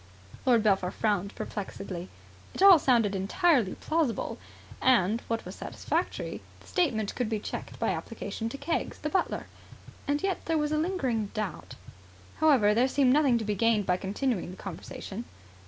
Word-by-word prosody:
Lord 235 -4 +5
Belpher 195 -4 +2
frowned 200 -1 -1
perplexedly. 190 -3 -6 0.5
It - - +1
all 385 -4 +10
sounded 235 -7 +3
entirely 230 - +2
plausible. 310 -7 -1 0.4
And, 230 -3 +3
what 230 0 -2
was - - -7
satisfactory, - - -3 0.2
the - - -19
statement 230 - 0
could 245 -4 -2
be 220 - 0
checked - - -6
by - - 0
application 225 0 -4
to 275 - -6
Keggs, 330 - -2
the 300 - -3
butler. 380 - 0 0.6
And 290 +3 0
yet 385 -2 -1
there 325 -1 +1
was 300 0 0
a 305 - +1
lingering 265 - 0
doubt. 210 -7 -4 0.6
However, 265 -10 +5
there 240 +4 +3
seemed 260 -1 +3
nothing 280 -5 +4
to 225 - -3
be 210 - 0
gained 215 0 +2
by 180 0 +2
continuing 200 +1 -2
the 185 - -9
conversation. 195 +4 -7
230 Hz, 160 wpm, -28 LUFS, 205-290 Hz, 0.6 s, all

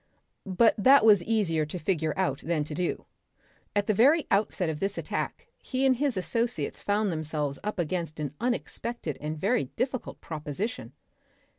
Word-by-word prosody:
But 195 +4 +4
that 265 +2 +6
was 205 -4 +7
easier 195 -9 +1
to 165 - -5
figure 160 -2 -1
out 190 -1 0
than 160 -2 -1
to 150 - -7
do. 175 +3 -2 0.7
At 205 0 +2
the 215 - +2
very 285 +10 +5
outset 200 -3 +1
of 155 -2 -3
this 195 +2 -2
attack 475 - -4
he 260 +1 -1
and 260 -2 +4
his 275 -5 0
associates 230 +7 -1
found 205 0 +1
themselves 150 -3 -3
up 210 0 -3
against 170 -2 -2
an 145 -2 -3
unexpected 235 - -2
and 155 +1 -3
very 205 - +1
difficult 255 - -4
proposition.... 160 - -5
195 Hz, 160 wpm, -28 LUFS, 155-235 Hz, 0.7 s, was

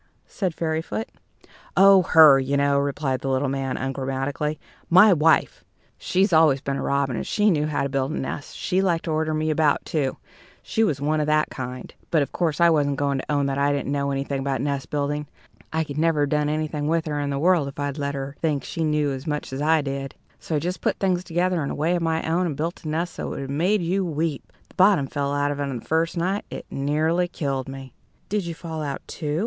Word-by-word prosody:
said 185 -5 -3
Fairyfoot 160 +7 -2 0.7
"Oh, 195 0 +8
her, 155 -5 +7
you 135 +1 0
know," 140 0 +3
replied 140 -2 -1
the 135 - -2
little 135 +1 +1
man, 135 -1 -2
ungrammatically, 135 +3 -2 0.3
"my 185 +4 +7
wife. 160 0 +2 0.4
She'd 190 0 +1
always 155 -4 +5
been 140 0 -3
a - - -3
robin, 140 -2 0
and - - -4
she 210 0 +3
knew 150 -3 +1
how 150 -2 -1
to 140 - -1
build 135 0 -1
a 155 - -3
nest; 145 +2 -5
she 185 0 0
liked 175 -4 0
to 165 - -2
order 155 0 0
me 155 0 0
about, 155 -1 +2
too 140 -4 -1 0.5
she 225 - 0
was 150 -10 0
one 155 +2 0
of 150 - 0
that 155 0 +2
kind. 125 -1 -7 0.2
But, 155 -3 +3
of - - -7
course, 160 -5 -1
I 170 - +6
wasn't 145 -3 +2
going 140 -1 0
to 150 - -5
own 145 -1 +1
that 140 0 -1
I 140 +1 +2
didn't 140 -1 -2
know 140 -1 0
anything 140 0 -2
about 135 -1 -1
nest 140 0 -2
building. 145 0 -2 0.4
I 160 0 0
could 150 -1 -5
never 160 -2 +2
have 145 - +1
done 150 0 +1
anything 150 -1 -2
with 165 +1 +1
her 150 -2 -2
in 145 -1 -2
the 140 - -1
world 165 -1 +3
if 140 - -9
I'd 145 0 -3
let 140 0 -2
her 135 +1 -5
think 150 -4 0
she 165 - -3
knew 150 -2 +1
as 135 +3 -6
much 150 -3 -3
as 135 - -3
I 155 0 +3
did. 135 -1 -4 0.2
So 160 - -3
I - - +2
just 180 +4 -3
put - - 0
things 185 -2 0
together 175 -1 0
in 140 - -3
a - - -3
way 165 +4 +1
of 175 - -1
my 160 -1 -1
own, 175 +3 +1
and 150 -5 -4
built 165 +3 -3
a - - -3
nest 165 +3 -2
that - - -4
would - - -5
have 135 - -6
made 180 +7 +1
you 190 +3 0
weep! 160 -3 -3 0.2
The - - -21
bottom 185 -6 +4
fell 140 +1 -2
out 145 0 0
of 145 - -4
it 145 - -1
the 120 -3 -6
first 165 +2 0
night. 190 +4 0
It - - -7
nearly 155 +5 +1
killed 135 -6 -3
me." 135 -2 -9 0.4
"Did 205 -3 -1
you 170 - -4
fall 160 -2 -6
out, 145 -2 -4
too?" 150 0 -3
150 Hz, 240 wpm, -24 LUFS, 140-165 Hz, 0.7 s, Oh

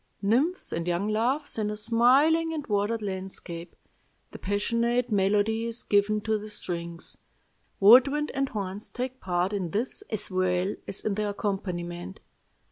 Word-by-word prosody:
Nymphs 265 - +1
and 165 +1 -3
young 175 +4 0
loves 240 +5 0
in 210 -1 0
a 210 - -3
smiling 260 +10 +3
and 295 -2 -4
watered 210 +2 0
landscape. 185 -3 -5 0.6
The - - -9
passionate 235 +4 0
melody 210 +3 +2
is 230 0 -3
given 210 +1 +2
to 220 0 0
the 215 +1 -8
strings. 170 -4 -6 0.6
Wood 240 +7 +8
wind 295 +2 -1
and 275 0 0
horns 200 -2 -5
take 255 +1 -5
part 180 +2 0
in 190 -4 -2
this 230 - -2
as 210 -2 -1
well 185 +1 +1
as 195 - -4
in 215 - -1
the 210 +1 -1
accompaniment. 185 -3 -4
210 Hz, 150 wpm, -27 LUFS, 190-235 Hz, 0.6 s, Wood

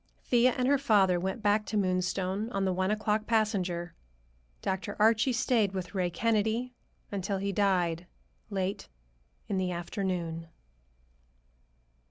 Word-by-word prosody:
Thea 245 0 +4
and 250 0 +1
her 280 0 +4
father 200 -9 +4
went 190 +5 -3
back 210 +1 +3
to 215 - -1
Moonstone 185 +2 0
on 195 0 0
the 190 - +1
one 185 +1 0
o'clock 215 0 0
passenger. 185 -6 0 0.7
Dr. 190 +2 -2
Archie 220 +4 +4
stayed 235 -5 +2
with 185 -1 -5
Ray 185 -3 0
Kennedy 225 +6 0 0.4
until 195 0 -2
he 200 +1 -2
died, 180 -4 +1 0.4
late 195 -1 -3 0.6
in 195 -2 -1
the 185 -1 0
afternoon. 170 -2 -3
195 Hz, 130 wpm, -30 LUFS, 185-220 Hz, 0.7 s, Thea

